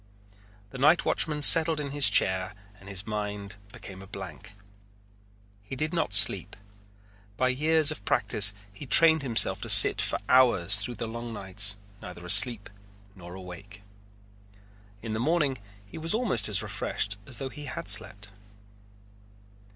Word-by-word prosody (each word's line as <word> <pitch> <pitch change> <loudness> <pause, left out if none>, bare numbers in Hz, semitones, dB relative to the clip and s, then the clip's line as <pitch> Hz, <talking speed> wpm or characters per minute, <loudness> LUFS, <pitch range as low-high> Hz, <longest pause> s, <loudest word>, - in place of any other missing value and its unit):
The 130 - -11
nightwatchman 150 0 0
settled 160 0 +6
into 140 -2 -7
his 145 -1 +1
chair 95 0 -1 0.2
and 100 +1 -15
his 100 0 -6
mind 105 -2 -7
became 95 -1 -13
a 95 - -14
blank. 95 -6 -12 1.1
He 105 +6 -10
did 155 +5 -5
not 170 - -3
sleep. - - +3 0.8
By 130 - -1
years 155 +3 +1
of 155 - -9
practice 100 -1 +1 0.2
he 120 - -12
had - - -20
trained 160 -2 +4
himself 120 -5 +3
to - - -7
sit - - +7
for - - -2
hours 105 -7 +2
through 120 +4 -4
the 115 - -7
long 115 +1 -9
nights 100 0 -2 0.2
neither 90 -1 -12
asleep 100 +3 +3 0.5
nor 90 -2 -13
awake. 100 +2 -13 1.2
In 110 -2 -6
the 110 - -5
morning 145 -1 -2 0.3
he 100 - -12
was 165 +5 -4
almost 165 - 0
as 100 -3 +1
refreshed 100 0 -3
as 130 - -6
though 135 - -7
he 150 +2 -12
had 130 - -8
slept. 105 -1 -1
110 Hz, 150 wpm, -25 LUFS, 100-140 Hz, 1.2 s, sit